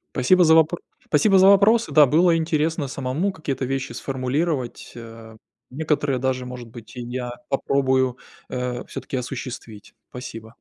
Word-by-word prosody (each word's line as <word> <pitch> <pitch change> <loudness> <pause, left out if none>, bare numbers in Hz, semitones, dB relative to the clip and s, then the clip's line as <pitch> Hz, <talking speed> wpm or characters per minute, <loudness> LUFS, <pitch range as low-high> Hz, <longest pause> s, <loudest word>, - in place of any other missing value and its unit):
Спасибо 180 +8 +4
за 160 0 +6
вопро 160 +2 +3 0.3
спасибо 190 +6 +3
за 190 - +6
вопросы. 215 +4 +4
Да, 150 -2 +7
было 165 +5 +3
интересно 160 -2 0
самому 140 +9 -2
какие-то 140 -6 -4
вещи 135 0 -3
сформулировать, 135 +1 -3
а, 115 -1 -11 0.3
некоторые 145 -1 -1
даже, 130 0 -1
может 125 -1 -8
быть, 115 +1 -13
и 125 - -6
я 120 0 -5 0.2
попробую, 130 -2 +1 0.3
э, 125 -1 -3
всё-таки 135 0 -6
осуществить. 125 -4 -7 0.2
Спасибо. 115 -2 -9
130 Hz, 140 wpm, -22 LUFS, 125-160 Hz, 0.3 s, Да